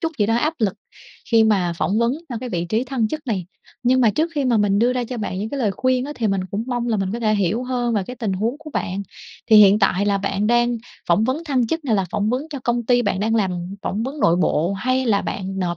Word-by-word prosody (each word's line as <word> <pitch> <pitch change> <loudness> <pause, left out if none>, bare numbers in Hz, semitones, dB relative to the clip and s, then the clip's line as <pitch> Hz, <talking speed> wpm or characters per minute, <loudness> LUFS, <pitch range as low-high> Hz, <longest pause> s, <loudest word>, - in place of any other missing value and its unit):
chút 325 0 -2
gì 205 - +3
đó 225 - +2
áp 305 +7 0
lực 205 -4 0 0.6
khi 225 -1 +5
mà 190 -5 +2
phỏng 210 +3 +1
vấn 235 +1 +2 0.2
trong 240 - -4
cái 250 +2 -6
vị 175 -4 -2
trí 225 +5 0
thăng 250 -4 -1
chức 305 +1 -6
này. 190 -7 -2 0.4
Nhưng 255 +1 +3
mà 230 -4 +5
trước 320 +8 0
khi 285 - 0
mà 245 -3 +2
mình 205 -1 +2
đưa 245 +3 +3
ra 250 -1 -1
cho 245 +1 -6
bạn 205 -4 -3
những 210 - -3
cái 280 - -4
lời 210 -4 +2
khuyên 255 +3 0
á, 290 - -5
thì 230 - 0
mình 195 -2 +1
cũng 210 +3 -3
mong 240 -1 -2
là 220 - +1
mình 195 -1 -2
có 235 - -4
thể 215 -1 +2
hiểu 200 +4 0
hơn 245 -2 -1
về 205 - +1
cái 250 - -7
tình 220 -6 -2
huống 220 +8 -1
của 310 -1 -10
bạn. 195 -4 -3 0.5
Thì 220 - +8
hiện 205 0 +7
tại 195 0 +2
là 200 -1 +2
bạn 200 +1 -1
đang 240 +1 +2 0.3
phỏng 175 +6 +3
vấn 270 +7 -1
thăng 260 -6 +1
chức 325 +4 -3
này 230 - +1
là 195 -2 +1
phỏng 205 +1 0
vấn 255 +3 0
cho 285 - -4
công 240 0 +1
ty 245 0 +3
bạn 190 - -1
đang 225 +2 +1
làm, 200 -4 +1 0.3
phỏng 210 +3 -2
vấn 280 +4 -5
nội 170 - +4
bộ 175 0 +1
hay 255 +6 0
là 205 -3 +2
bạn 195 0 -4
nộp 175 -2 -1
225 Hz, 285 wpm, -21 LUFS, 200-250 Hz, 0.6 s, Thì